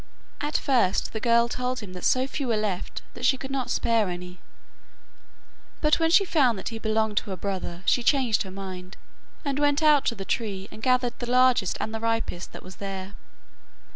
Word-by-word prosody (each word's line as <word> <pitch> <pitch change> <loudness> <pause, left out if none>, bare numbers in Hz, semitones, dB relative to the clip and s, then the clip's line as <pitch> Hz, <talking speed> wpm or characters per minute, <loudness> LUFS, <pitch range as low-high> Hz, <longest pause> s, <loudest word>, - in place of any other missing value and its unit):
At 295 +1 0
first 240 -9 +1
the 220 - -2
girl 235 +1 +4
told 250 +1 -3
him 195 -3 -9
that 180 - -8
so 255 0 +3
few 275 0 -4
were 230 -2 +1
left 205 -4 -3
that - - -10
she 270 - +4
could 265 +1 -7
not 265 -3 -2
spare 225 -4 +2
any; 180 0 -7 1.4
but 300 +1 +3
when 325 0 +3
she 390 +4 +5
found 265 - +3
that - - -4
he 225 -1 -6
belonged 220 -1 0
to - - 0
her 190 - -4
brother, 185 -2 -4
she 245 - +3
changed 250 -4 +2
her 190 - -4
mind, 185 -1 -8 0.5
and 280 0 -1
went 290 +1 +2
out 300 -2 +5
to 230 - +1
the 195 -2 -7
tree 195 -4 -2
and 215 - -11
gathered 255 0 +1
the 240 - -4
largest 250 -6 +3
and 220 - -3
the 225 - -3
ripest 225 -6 -2
that - - -10
was 185 0 -11
there. 195 0 -6
230 Hz, 200 wpm, -26 LUFS, 195-255 Hz, 1.4 s, she